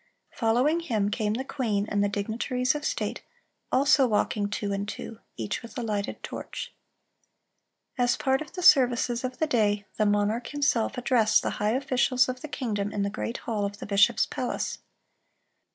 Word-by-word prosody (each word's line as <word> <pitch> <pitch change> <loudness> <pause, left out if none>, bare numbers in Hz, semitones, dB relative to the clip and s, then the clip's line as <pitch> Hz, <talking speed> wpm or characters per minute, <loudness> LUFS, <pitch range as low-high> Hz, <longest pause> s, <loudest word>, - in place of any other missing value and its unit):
Following 250 +8 +2
him 220 -11 -1
came 210 -1 0
the 260 - -2
queen 220 -7 -1
and 205 -1 +1
the 205 - +1
dignitaries 235 +5 -1
of 295 0 -5
state, - - -2 0.5
also 275 0 +4
walking 210 -1 0
two 200 0 -2
and 200 +1 -3
two, 225 +1 -7 0.2
each 110 -2 -3
with 230 +4 -11
a 245 - -2
lighted 210 -2 -3
torch. - - -6 1.3
As 245 0 +3
a - - -12
part 265 +1 +1
of 310 - -8
the 360 - -5
services 245 -7 +4
of 255 0 -4
the 315 - +1
day, 210 -7 +1
the 215 - +2
monarch 205 +3 +1
himself 280 -4 0
addressed 245 -3 +3
the - - -1
high 210 +1 +2
officials 255 -1 +2
of 255 0 -4
the - - -6
kingdom 210 -8 -2
in 205 -1 -1
the 200 - -1
great 230 +3 -4
hall 215 -3 -1
of 200 0 -3
the - - -7
bishop's 205 +3 +4
palace. 250 - -3
230 Hz, 180 wpm, -27 LUFS, 205-255 Hz, 1.3 s, also